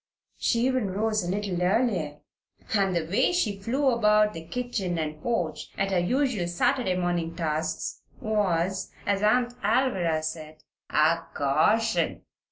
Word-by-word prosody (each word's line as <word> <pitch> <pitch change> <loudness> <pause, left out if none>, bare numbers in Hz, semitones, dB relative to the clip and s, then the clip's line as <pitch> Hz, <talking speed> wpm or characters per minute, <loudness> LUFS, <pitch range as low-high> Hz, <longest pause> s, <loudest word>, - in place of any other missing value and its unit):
She 235 - +1
even 255 -4 +1
rose 215 +1 0
a 175 - -3
little 195 -2 -2
earlier, 180 -7 0 0.5
and 195 -3 +2
the 165 -2 0
way 205 - +2
she 220 - 0
flew 260 +7 +1
about 210 -2 +3
the 165 - -6
kitchen 195 -2 -3
and 155 -1 -3
porch 175 -9 -2
at 195 0 0
her 185 - +2
usual 235 -1 0
Saturday 240 +3 +1
morning 175 -2 -1
tasks 160 -1 -2 0.2
was, 190 -4 0
as 200 -1 +1
Aunt 240 +3 +2
Alvirah 185 -11 +1
said, 155 -1 -6 0.3
"a 160 +2 +3 0.2
caution." 160 +11 +1
195 Hz, 140 wpm, -26 LUFS, 170-230 Hz, 0.5 s, about